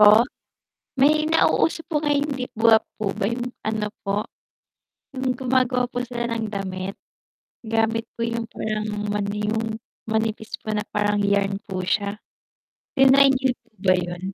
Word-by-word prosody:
Po? 210 +2 +8 0.7
May 305 +3 +4
nauuso 325 0 +3
po 300 - +2
ngayon 290 -1 +2
'di 255 -2 -4
ba 225 0 +6 0.2
po 210 -3 -1
ba 200 - -1
'yung 245 +1 -3 0.2
ano 215 -1 -2
po, 200 +1 -1 0.9
'yung 260 -2 -1
gumagawa 250 -1 +1
po 245 - -2
sila 235 -1 -3
ng 225 -1 -1
damit, 195 -2 -4 0.7
gamit 225 0 +1
po - - -13
'yung 230 0 -2
parang 215 -1 -3 0.3
ano 200 -1 -1
'yung 220 +2 -2 0.2
manipis 220 0 -2
po - - -12
na 210 - -1
parang 205 0 +1
yarn 200 -1 +2
po 190 -3 -4
siya. 200 +3 -1 0.7
Tinry 270 0 +6
niyo 260 -1 +1
po 235 - -34
ba 185 -1 +4
'yon? 175 -1 -4
225 Hz, 150 wpm, -23 LUFS, 205-250 Hz, 0.9 s, Po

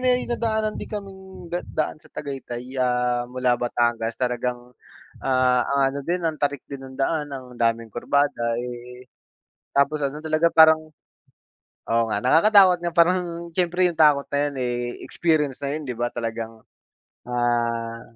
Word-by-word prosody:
may 250 -1 +2
nadaanan 220 -3 -1
din - - -7
kaming 190 -4 -9
da 175 - 0
daan 155 0 -2
sa - - -19
Tagaytay, 130 -3 -7
ah, 125 -1 +1
mula 125 0 +1
Batangas 120 -1 0
talagang, 125 0 -2 0.5
ah, 130 -2 +3
ang 140 0 +1
ano - - -3
din 175 0 -1
ang 160 -2 -2
tarik 145 -2 -1
din 140 -1 -7
ng 130 0 -11
daan, 150 +2 0
ang 130 -2 -8
daming 115 -1 0
kurbada 120 -2 0
eh, 125 +1 -8 0.7
tapos 145 +1 +2
ano 145 +2 -3
talagang 160 +1 +1
parang 160 0 +8 1.1
oo 115 0 +3
nga, 100 - 0
nakakatakot 185 +5 +6
nga 170 - 0
parang 170 0 +2
siyempre 180 0 +2
'yung 170 - -8
takot 145 -2 +5
na 140 - -1
'yan - - -10
eh 120 -1 -1 0.3
,experience 150 -6 0
na 140 - -2
'yun 155 - -5
'di 125 - -3
ba, 120 - +1
talagang, 115 -1 -5 0.7
ah, 115 -1 -1
140 Hz, 155 wpm, -23 LUFS, 120-165 Hz, 1.1 s, parang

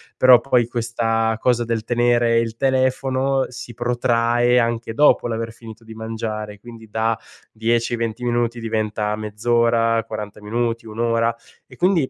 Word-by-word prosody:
Però 130 -1 +7
poi 120 -1 +2
questa 115 -1 0
cosa 120 -1 +2
del 115 -1 -2
tenere 120 0 +2
il 115 -1 -2
telefono 130 +1 +1
si 120 -1 -9
protrae 120 0 +1
anche 115 -1 -1
dopo 145 -1 +4
l'aver 115 -1 -3
finito 115 -1 -12
di 110 0 -11
mangiare, 110 -2 -5
quindi 115 -1 -12
da 110 +1 0 0.3
10, 115 +2 0
20 115 +1 -3
minuti 120 -1 -1
diventa 110 -1 -1
mezz'ora, 115 +2 +1
40 105 -1 -7
minuti, 115 +2 -2
1 110 0 -9
ora. 115 0 +1 0.3
E, - - -15
quindi, 175 -6 +2
115 Hz, 145 wpm, -21 LUFS, 110-120 Hz, 0.3 s, Però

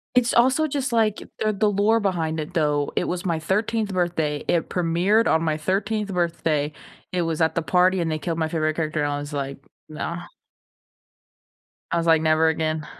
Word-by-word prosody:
It's 245 -1 +3
also 260 +6 +4
just, 275 -3 -2
like, 220 -3 +2 0.2
the 215 0 +1
the 210 +1 +1
lore 210 +3 +2
behind 165 -6 -1
it, 160 +4 -7
though. 150 -3 +1
It - - +1
was 180 0 -3
my 165 -3 0
13th 210 +5 -1
birthday, 165 -5 -1
it 170 - +1
premiered 180 +6 +2
on 160 - +2
my 155 -2 0
13th 200 +5 -1
birthday, 160 -4 0 0.4
it 180 -1 0
was 165 -1 -2
at 160 0 +2
the 170 - 0
party 180 +2 +3
and 165 -1 -1
they 155 - -1
killed 165 +2 -3
my 160 -1 0
favorite 155 -1 0
character, 155 -1 -1
and 145 - -1
I 145 - -2
was 145 +1 -7
like, 140 -1 -4 0.3
"Nah." 170 +3 -5 1.7
I 170 - +1
was 170 0 0
like, 165 -1 +5
"Never 160 0 +3
again." 155 -1 -1
170 Hz, 195 wpm, -23 LUFS, 155-200 Hz, 1.7 s, like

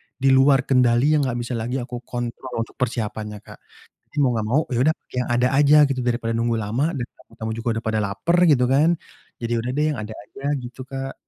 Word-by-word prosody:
di 135 0 +2
luar 135 0 +5
kendali 125 +1 +3
yang 150 -3 +2
gak 125 - -2
bisa 120 0 -3
lagi 120 +3 -3
aku 120 0 -6
kontrol 120 +1 -5
untuk - - -17
persiapannya, 110 -4 -3
Kak. - - -13 0.6
Mau 130 - +3
gak 105 - -2
mau 135 +8 +3
ya 120 - 0
udah 160 - +3
pakai - - -13
yang - - -8
ada 125 +1 +3
aja 145 +2 +5
gitu 135 -2 -1
daripada 120 -1 0
nunggu 115 0 0
lama 115 +10 -1
dan 125 - -2 0.2
tamu-tamu 110 0 -6
juga 115 +1 -6
udah - - -13
pada 110 -1 +1
lapar 105 - 0
gitu 140 -5 +4
kan, 155 +6 +4 0.5
jadi 115 0 -1
udah 120 +2 -3
deh 150 +1 +2
yang 140 - -4
ada 110 +1 -6
aja 105 +6 -13
gitu, 125 -1 -7
Kak. 135 0 -5
125 Hz, 220 wpm, -22 LUFS, 115-135 Hz, 0.6 s, luar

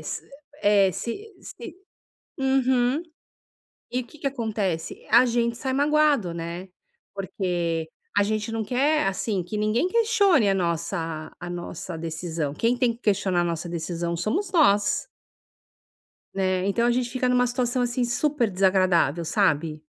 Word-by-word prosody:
eh, - - -11
se - - -6 0.3
eh, 200 -2 +4
se 405 - -6
se 350 -2 -10 0.6
Uhum. 265 +1 +2 0.9
E 250 - 0
o - - -15
que 305 - -16
que 280 - -5
acontece? 215 -10 -2
A 245 +2 +7
gente 235 -1 0
sai 260 +1 -3
magoado, 285 - +2
né, 170 +3 -6 0.5
porque 175 -4 -2 0.3
a - - +5
gente 215 +2 -1
não 225 -1 -1
quer, 275 +2 +2
assim, 195 0 -1
que 210 +5 -6
ninguém 215 +10 +1
questione 405 - +3
a 195 - +2
nossa 165 -2 -2
a 175 - -6
nossa 175 0 -6
decisão. 160 -2 -3
Quem 230 +8 +1
tem 245 -2 +2
que 230 - -19
questionar 195 -5 +1
a - - 0
nossa 170 0 -3
decisão 170 0 -3
somos 345 - -1
nós. 205 - +3 1.3
Né, 185 -1 0
então 235 +4 +2
a 240 - +3
gente 245 -1 -1
fica 255 +1 0
numa 250 0 +3
situação, 245 0 0
assim, 245 0 0
super 245 0 +1
desagradável, 185 -4 +2
sabe. 160 -5 +1
210 Hz, 150 wpm, -25 LUFS, 175-250 Hz, 1.3 s, A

